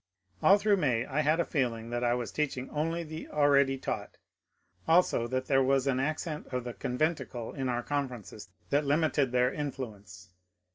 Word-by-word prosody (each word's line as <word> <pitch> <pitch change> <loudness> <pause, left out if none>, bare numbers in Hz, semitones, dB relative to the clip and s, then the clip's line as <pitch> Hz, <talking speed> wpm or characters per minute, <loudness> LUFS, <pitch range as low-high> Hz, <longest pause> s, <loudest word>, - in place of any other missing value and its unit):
AH 195 - +7
through 205 0 +3
May 125 -8 +1
I 135 +3 -2
had 155 +2 +2
a 170 - +2
feeling 120 -5 -2
that 120 0 -1
I 120 0 +2
was 120 -2 -4
teaching 135 -4 -2
only 165 +3 -1
the 155 0 -7
already 140 -2 +3
taught; - - -5 0.7
also 165 -8 +3
that 130 +1 -2
there 135 0 +3
was 135 0 +2
an 130 -2 +1
accent 155 +2 -3
of 125 -1 -3
the 120 -1 -5
conventicle 130 -3 -2
in 135 -2 -2
our 120 0 -1
conferences 125 -9 -4 0.2
that 145 +1 +3
limited 145 -2 +2
their 125 +1 +2
influence. 105 -10 -6
135 Hz, 175 wpm, -30 LUFS, 125-150 Hz, 0.7 s, AH